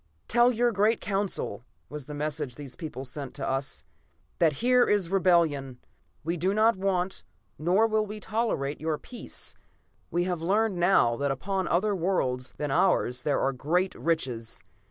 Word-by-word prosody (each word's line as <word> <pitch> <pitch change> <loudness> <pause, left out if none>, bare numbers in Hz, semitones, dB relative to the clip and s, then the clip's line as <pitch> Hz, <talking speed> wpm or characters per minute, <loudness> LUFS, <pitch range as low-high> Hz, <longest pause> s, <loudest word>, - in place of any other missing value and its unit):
"'Tell 240 +2 +5
your 240 0 +2
great 215 +2 +2
Council,' 195 - -2 0.2
was 150 -2 -7
the 150 +1 -7
message 150 -3 -3
these 140 -3 -8
people 145 -6 -6
sent 135 +1 -6
to 140 - -3
us, 135 0 -2 0.6
'that 160 -3 +4
here 250 - +3
is 195 -4 +1
rebellion. 165 -9 +2 0.5
We 170 +3 -1
do 185 +5 +1
not 220 +1 +4
want, 190 -1 -1 0.4
nor 180 +8 +3
will 215 -1 +1
we 210 +1 -6
tolerate, 210 -12 -1
your 155 -1 0
peace. 245 - -9 0.6
We 175 +1 +1
have 180 -2 -2
learned 200 +3 +1
now 170 -10 +4
that 140 0 0
upon 190 +8 -1
other 200 +4 +2
worlds 130 -9 -1
than 150 -2 -2
ours 125 -2 +2
there 145 +2 +1
are 135 - +1
great 175 +8 0
riches. 130 -9 -2
170 Hz, 160 wpm, -28 LUFS, 140-200 Hz, 0.6 s, Tell